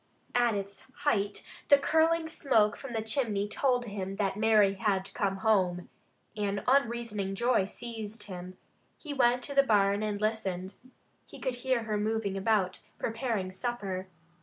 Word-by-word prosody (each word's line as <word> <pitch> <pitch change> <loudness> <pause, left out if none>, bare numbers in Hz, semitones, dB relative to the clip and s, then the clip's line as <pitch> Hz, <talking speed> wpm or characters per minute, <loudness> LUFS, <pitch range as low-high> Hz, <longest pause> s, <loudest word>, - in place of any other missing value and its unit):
At 240 -3 +3
its 200 0 -6 0.2
height 205 -7 +1 0.2
the 285 - +8
curling 320 +3 +2
smoke 230 -9 +2
from 270 -3 -8
the 220 -1 -1
chimney 220 -4 0
told 245 +3 +1
him 195 -3 -4
that 195 -1 0
Mary 210 -2 +4
had 195 -1 -1
come 195 -2 -1
home. 185 -4 +1 0.5
An 200 -2 -2
unreasoning 235 -7 +1
joy 235 -2 +2
seized 220 0 -7
him. 185 -2 -8 0.4
He 300 -3 -6
went 245 -2 +3
to 285 - -3
the 275 - +6
barn 205 -5 +3
and 210 -1 -2
listened. 195 -4 -2 0.5
He - - -11
could 255 -2 -2
hear 250 -1 0
her 215 -1 -1
moving 215 -2 -1
about 195 -2 +1 0.2
preparing 225 -5 -2
supper. 190 -3 -3
215 Hz, 150 wpm, -30 LUFS, 195-240 Hz, 0.5 s, the